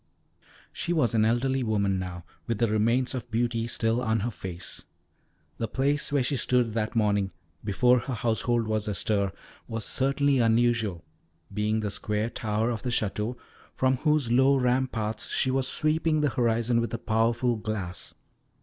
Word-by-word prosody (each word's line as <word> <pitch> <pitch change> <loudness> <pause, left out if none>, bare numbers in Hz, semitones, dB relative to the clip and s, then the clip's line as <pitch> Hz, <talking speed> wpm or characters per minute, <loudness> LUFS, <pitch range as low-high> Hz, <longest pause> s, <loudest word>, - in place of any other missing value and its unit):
She 175 - -2
was 150 -9 +2
an 110 -1 +3
elderly 130 +4 +1
woman 100 -5 0
now, 90 -2 -6 0.2
with 115 -2 -1
the 115 - +2
remains 115 +4 +1
of 125 -2 -5
beauty 115 0 0
still 115 +1 +1
on 110 -2 0
her 120 +4 -2
face. 90 -4 -7 0.7
The 115 - -1
place 145 +6 0
where 140 -3 +2
she 135 +2 +1
stood 120 -2 +1
that 110 +1 -2
morning, 105 -3 +2 0.3
before 125 +5 +3
her 125 +1 -4
household 115 0 0
was 110 -1 -1
astir, 100 -1 0 0.4
was 115 -1 -3
certainly 140 0 +2
unusual, 115 -6 +1 0.5
being 105 +1 0
the 105 -1 -2
square 105 +2 -2
tower 110 +2 -1
of 115 - -4
the 125 - -3
Château, 110 +1 -1 0.4
from 130 0 +2
whose 150 -4 +1
low 130 +3 +5
ramparts 125 -4 0
she 130 - +1
was 130 0 +1
sweeping 155 +1 +1
the 150 - +2
horizon 115 0 +1
with 115 -2 -3
a - - -2
powerful 115 +2 +1
glass. 105 -5 -5
115 Hz, 160 wpm, -27 LUFS, 110-125 Hz, 0.7 s, low